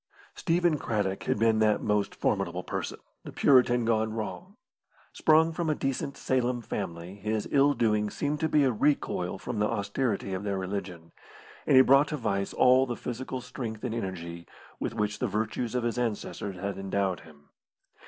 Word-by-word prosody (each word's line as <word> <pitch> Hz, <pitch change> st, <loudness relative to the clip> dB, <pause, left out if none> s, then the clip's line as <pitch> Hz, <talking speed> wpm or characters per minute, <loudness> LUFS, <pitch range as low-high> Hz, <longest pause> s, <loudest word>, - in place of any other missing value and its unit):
Stephen 170 Hz, -3 st, +1 dB
Craddock 100 Hz, -5 st, -2 dB
had -, -, +1 dB
been 110 Hz, 0 st, +3 dB
that 110 Hz, -1 st, +3 dB
most 105 Hz, -1 st, 0 dB
formidable -, -, -1 dB
person, -, -, -4 dB, 0.3 s
the -, -, -8 dB
Puritan 125 Hz, -3 st, +4 dB
gone 110 Hz, -1 st, +1 dB
wrong. 180 Hz, -, -6 dB, 0.6 s
Sprung 160 Hz, +1 st, +4 dB
from 165 Hz, 0 st, -2 dB
a 155 Hz, -, +2 dB
decent 135 Hz, 0 st, -3 dB
Salem 125 Hz, -1 st, 0 dB
family, 85 Hz, -4 st, -5 dB
his 105 Hz, +1 st, -3 dB
ill 140 Hz, 0 st, +4 dB
doing 105 Hz, -2 st, +1 dB
seemed 145 Hz, +6 st, -2 dB
to 160 Hz, -, 0 dB
be 150 Hz, -1 st, +4 dB
a 130 Hz, -, +3 dB
recoil 105 Hz, -7 st, 0 dB
from 110 Hz, +3 st, -4 dB
the 105 Hz, -, +2 dB
austerity 100 Hz, -1 st, -1 dB
of 95 Hz, +1 st, -3 dB
their 100 Hz, -1 st, -1 dB
religion, 90 Hz, -3 st, -5 dB, 0.6 s
and -, -, +5 dB
he 130 Hz, -, +9 dB
brought 140 Hz, +3 st, +5 dB
to 150 Hz, -, -3 dB
vice 100 Hz, -5 st, -1 dB
all 130 Hz, +1 st, +5 dB
the 120 Hz, -, -3 dB
physical 125 Hz, +1 st, -5 dB
strength 110 Hz, -4 st, -6 dB
and 125 Hz, -3 st, -2 dB
energy 85 Hz, -6 st, -5 dB, 0.3 s
with -, -, -3 dB
which 105 Hz, 0 st, -1 dB
the 125 Hz, -, 0 dB
virtues 110 Hz, +3 st, -2 dB
of 125 Hz, -, 0 dB
his 120 Hz, 0 st, -1 dB
ancestors 105 Hz, -4 st, -3 dB
had 100 Hz, +2 st, -4 dB
endowed 95 Hz, -1 st, -1 dB
him. 75 Hz, -3 st, -18 dB
110 Hz, 175 wpm, -28 LUFS, 100-130 Hz, 0.6 s, he